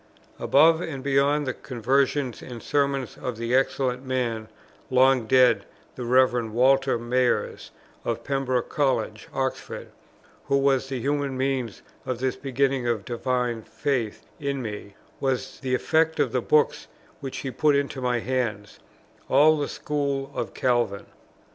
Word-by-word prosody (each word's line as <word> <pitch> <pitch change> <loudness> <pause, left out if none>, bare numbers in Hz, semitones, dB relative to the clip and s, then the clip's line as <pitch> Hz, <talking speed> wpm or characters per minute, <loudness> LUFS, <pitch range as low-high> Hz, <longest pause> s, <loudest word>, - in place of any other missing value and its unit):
Above 160 +4 +5
and 135 -6 -5
beyond 140 +1 +2
the 130 - -2
conversations 130 +2 0
and 120 -3 -9
sermons 140 -3 -1
of 125 -3 -4
the 115 +1 -2
excellent 130 -1 +1
man, 120 -4 -2 0.4
long 130 -2 +4
dead, 130 0 +5 0.3
the 125 - -5
Rev. 125 -2 +3
Walter 130 +2 +3
Mayers, 125 +1 0 0.3
of 115 0 -3
Pembroke 130 -3 -1
College, 120 -6 -1
Oxford, 130 -1 -4 0.6
who 140 - +2
was 135 -1 +2
the 130 -2 -3
human 140 0 -1
means 130 -4 -2 0.2
of 130 - -3
this 130 +1 -1
beginning 135 -1 0
of 115 -4 -1
divine 125 -1 -1
faith 120 -2 -2 0.2
in 140 -1 -2
me, 105 -4 -6 0.2
was 135 -2 -2
the 130 -2 0
effect 160 +4 +1
of - - +2
the - - 0
books 455 +2 +2 0.3
which 135 -3 -6
he 135 - -4
put 150 +2 +2
into 140 -1 -1
my 125 -1 +1
hands, 115 -5 -3 0.5
all 150 +4 +6
of 155 - -2
the 145 - -1
school 140 -2 -2
of - - -4
Calvin. 120 -6 0
130 Hz, 145 wpm, -25 LUFS, 120-140 Hz, 0.6 s, all